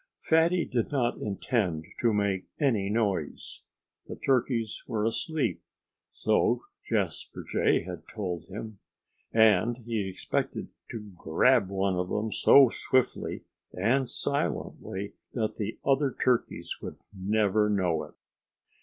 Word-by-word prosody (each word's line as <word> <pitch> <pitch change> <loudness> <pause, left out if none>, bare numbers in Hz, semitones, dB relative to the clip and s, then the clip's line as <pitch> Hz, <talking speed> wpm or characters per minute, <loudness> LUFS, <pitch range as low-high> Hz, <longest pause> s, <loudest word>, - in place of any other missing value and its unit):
Fatty 165 +2 +3
did 120 -3 -1
not 125 -4 0
intend 100 -5 -1
to 115 - +3
make 100 -3 0
any 115 -10 +2
noise. 100 -8 -1 0.5
The - - -6
turkeys 120 -4 0
were 105 -1 -1
asleep 115 - -1 0.5
so - - +1 0.2
Jasper - - -2
Jay - - +2
had - - -8
told 90 -5 -4
him 110 +1 -7 0.5
and 110 +1 +4
he 110 -5 -1
expected 95 - -2 0.2
to 105 -3 -7
grab 100 +7 +3
one 95 -1 0
of 90 0 -1
them 110 +1 -1
so 135 +3 +7
swiftly 130 +2 0 0.3
and 120 +7 +1
silently 100 -8 -2 0.2
that 110 -3 -1
the 110 0 -3
other 135 0 +3
turkeys 125 -2 0
would - - -7 0.2
never 105 +1 +2
know 90 -6 +1
it. - - -17
110 Hz, 120 wpm, -28 LUFS, 95-125 Hz, 0.5 s, so